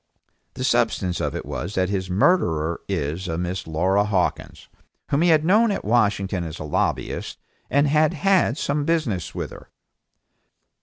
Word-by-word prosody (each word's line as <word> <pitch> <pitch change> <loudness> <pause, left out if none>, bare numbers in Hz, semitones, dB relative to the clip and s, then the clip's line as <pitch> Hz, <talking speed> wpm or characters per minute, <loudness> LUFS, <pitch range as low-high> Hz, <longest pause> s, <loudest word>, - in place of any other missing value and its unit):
The 130 - -4
substance 115 -8 +1
of - - -2
it - - -5
was 90 +6 -5
that 95 0 +1
his 95 -2 -2
murderess 85 - +2
is 85 0 -2
a 80 -1 -2
Miss 90 +1 -3
Laura 95 +6 +2
Hawkins, 100 -4 -2 0.4
whom 140 - +2
he 175 - +4
had 155 -1 +4
known 215 +6 +4
at 200 - -3
Washington 100 -5 +1
as 80 0 -6
a - - -6
lobbyist 75 - -2 0.3
and 140 +1 +3
had 155 0 +2
some 145 -1 -1
business 145 - -1
with - - -4
her. - - -13
100 Hz, 155 wpm, -23 LUFS, 90-150 Hz, 0.4 s, he